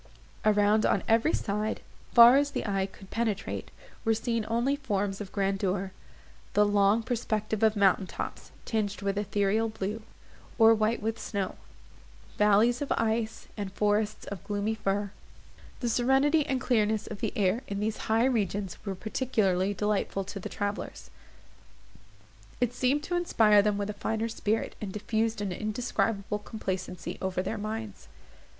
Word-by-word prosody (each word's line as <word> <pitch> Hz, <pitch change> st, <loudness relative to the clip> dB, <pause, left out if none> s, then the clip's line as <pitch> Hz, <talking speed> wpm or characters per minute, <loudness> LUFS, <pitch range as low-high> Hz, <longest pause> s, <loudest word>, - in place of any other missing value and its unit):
Around, 210 Hz, 0 st, +4 dB
on -, -, +2 dB
every 230 Hz, +7 st, +3 dB
side, 210 Hz, +1 st, -1 dB, 0.3 s
far 235 Hz, +2 st, +9 dB
as 285 Hz, +1 st, +3 dB
the -, -, -3 dB
eye 195 Hz, -2 st, 0 dB
could 195 Hz, 0 st, -15 dB
penetrate, 220 Hz, -3 st, -2 dB, 0.3 s
were 225 Hz, -2 st, +2 dB
seen 230 Hz, -1 st, -1 dB
only 240 Hz, +5 st, +1 dB
forms 205 Hz, -7 st, -2 dB
of 195 Hz, -, -7 dB
grandeur—the 195 Hz, +1 st, -2 dB
long 205 Hz, +2 st, +3 dB
perspective 220 Hz, -3 st, -2 dB
of 220 Hz, -1 st, +4 dB
mountain 195 Hz, -1 st, +3 dB
tops, -, -, -6 dB, 0.2 s
tinged 210 Hz, -3 st, -2 dB
with 200 Hz, 0 st, 0 dB
ethereal 205 Hz, +2 st, +1 dB
blue, 215 Hz, +1 st, -4 dB, 0.6 s
or 225 Hz, -1 st, +7 dB
white 220 Hz, 0 st, 0 dB
with 225 Hz, +1 st, -2 dB
snow; 200 Hz, -3 st, -3 dB, 0.9 s
valleys 210 Hz, +4 st, +4 dB
of 285 Hz, -, -3 dB
ice, 225 Hz, 0 st, -1 dB
and 200 Hz, -3 st, -4 dB
forests 210 Hz, +1 st, 0 dB
of 200 Hz, -4 st, -7 dB
gloomy 205 Hz, +1 st, -1 dB
fir. 205 Hz, -2 st, -1 dB, 0.7 s
The 240 Hz, -, 0 dB
serenity 270 Hz, +6 st, +3 dB
and 265 Hz, -1 st, 0 dB
clearness 220 Hz, -4 st, +1 dB
of 215 Hz, -, -7 dB
the -, -, -1 dB
air 205 Hz, +3 st, +1 dB
in 200 Hz, -1 st, -3 dB
these 215 Hz, +1 st, -1 dB
high 225 Hz, +2 st, +4 dB
regions 205 Hz, -6 st, -1 dB
were 195 Hz, -2 st, -3 dB
particularly 205 Hz, -3 st, 0 dB
delightful 205 Hz, 0 st, -1 dB
to 200 Hz, +1 st, -7 dB
the -, -, -6 dB
travellers; 205 Hz, 0 st, -4 dB, 1.5 s
it 245 Hz, -1 st, +1 dB
seemed 260 Hz, +4 st, +1 dB
to 350 Hz, -, -2 dB
inspire 220 Hz, -12 st, +4 dB
them 205 Hz, 0 st, +1 dB
with 205 Hz, 0 st, -2 dB
a -, -, -8 dB
finer 220 Hz, +2 st, -2 dB
spirit, 220 Hz, 0 st, -1 dB
and 205 Hz, -3 st, -4 dB
diffused 220 Hz, +2 st, -1 dB
an 200 Hz, -2 st, -2 dB
indescribable 215 Hz, 0 st, -1 dB
complacency 185 Hz, -4 st, -5 dB
over 185 Hz, -1 st, -1 dB
their 215 Hz, +3 st, -3 dB
minds. 215 Hz, -1 st, -5 dB
215 Hz, 150 wpm, -28 LUFS, 200-225 Hz, 1.5 s, far